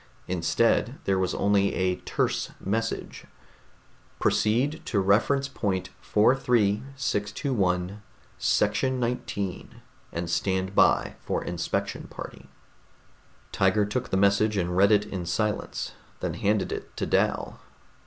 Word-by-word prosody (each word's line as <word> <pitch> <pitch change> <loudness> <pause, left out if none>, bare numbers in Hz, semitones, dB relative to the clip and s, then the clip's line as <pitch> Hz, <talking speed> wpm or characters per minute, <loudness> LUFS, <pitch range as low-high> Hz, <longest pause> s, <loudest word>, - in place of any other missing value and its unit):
Instead, 90 - +1
there 95 -1 +1
was 95 -1 0
only 100 -1 +2
a 90 -1 +1
terse - - -1
message: 115 +3 -3 0.9
PROCEED 130 +9 +1
TO 105 - 0
REFERENCE 115 +8 +3
POINT 95 -3 -2
43621 105 -4 +1 0.4
SECTION 125 +5 +1
XIX 110 -6 -2 0.5
AND 85 +1 -3
STAND 95 +2 0
BY - - +3
FOR - - -2
INSPECTION 85 -1 -3
PARTY - - -9 1.0
Tiger 95 +2 +3
took 125 +5 -3
the 95 - +1
message 100 +2 +3
and 90 -1 0
read 100 +3 +5
it 105 -1 +4
in 95 -4 -4
silence, 105 +4 -2 0.3
then - - -2
handed 105 0 0
it - - -6
to - - -1
Dal. - - 0
100 Hz, 115 wpm, -27 LUFS, 95-115 Hz, 1.0 s, read